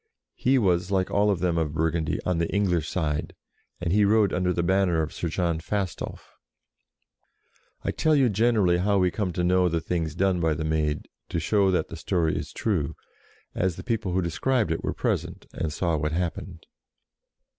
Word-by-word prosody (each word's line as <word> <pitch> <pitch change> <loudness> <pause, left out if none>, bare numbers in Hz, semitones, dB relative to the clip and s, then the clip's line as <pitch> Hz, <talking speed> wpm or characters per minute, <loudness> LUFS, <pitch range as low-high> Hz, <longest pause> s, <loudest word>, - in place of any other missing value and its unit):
He 135 +1 +2
was, 90 -5 +2
like 95 -2 0
all 105 +1 +3
of 95 -4 0
them 85 -2 +1
of 75 -2 -1
Burgundy, 80 0 0
on 90 -2 0
the 85 - -1
English 90 -6 +1
side, 75 -4 -2 0.4
and 85 0 -1
he 105 +1 +4
rode 105 -1 +3
under 90 0 +1
the 85 -1 0
banner 90 -2 +2
of 80 - -5
Sir 85 - -3
John 85 -1 0
Fastolf. 95 +2 -4 1.4
I - - 0
tell 155 -1 +2
you 135 -3 +4
generally 105 -5 +2
how 100 +2 +2
we 90 -2 +3
come 100 -2 -2
to 90 - -1
know 90 0 +3
the 85 0 0
things 80 -2 -2
done 95 0 +1
by 80 -2 +1
the 80 - -3
Maid, 75 -1 -1 0.2
to 85 - -1
show 100 +4 +2
that 90 - 0
the - - -7
story 85 -4 0
is - - -4
true, 90 -11 -1 0.6
as 90 -2 0
the - - -8
people 115 -5 -1
who 95 0 +1
described 95 +5 0
it 80 - -2
were - - -2
present, - - -2
and 80 - -2
saw 85 +2 0
what 75 +1 -1
happened. 85 0 -4
90 Hz, 190 wpm, -26 LUFS, 80-100 Hz, 1.4 s, he